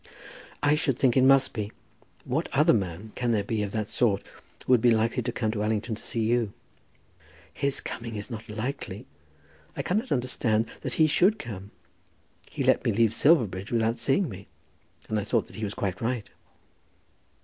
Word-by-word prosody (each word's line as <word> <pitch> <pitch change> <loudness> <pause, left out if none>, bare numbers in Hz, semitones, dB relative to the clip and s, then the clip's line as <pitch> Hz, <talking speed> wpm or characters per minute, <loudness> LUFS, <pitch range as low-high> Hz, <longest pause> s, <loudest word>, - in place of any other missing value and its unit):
"I 145 0 +5
should 150 -4 +1
think 130 -3 +3
it 130 - +5
must 135 0 +5
be. 105 -2 -4 0.5
What 135 +6 -1
other 150 +4 +5
man 95 0 -2
can 120 -2 0
there 105 -2 +1
be, 110 +1 -2
of 105 - -1
that 110 -2 -1
sort, 105 -5 +1 0.4
who - - 0
would 120 - +5
be 120 - +5
likely 115 +2 +2
to 120 +1 -2
come 110 -2 -1
to 105 -2 -3
Allington 110 +1 -1
to 110 - -6
see 115 - -2
you?" 115 -2 +1 1.0
"His 140 -1 0
coming 115 -1 -6
is 105 +4 -6
not 110 -1 -7
likely. 120 +6 -5 0.7
I - - -1
cannot 220 +7 -1
understand 115 -4 +1
that - - -4
he 160 - +5
should 180 +8 +3
come. 100 -4 -7 0.8
He - - -3
let - - +3
me - - +2
leave 115 +1 +3
Silverbridge 110 - +2
without 115 0 +1
seeing 135 +10 +2
me, 100 -3 -9 0.6
and 110 - 0
I - - -2
thought 115 +1 +1
that - - -13
he 110 - -5
was 100 -1 -3
quite 100 -1 -3
right." 115 -1 -2
115 Hz, 185 wpm, -27 LUFS, 105-130 Hz, 1.0 s, I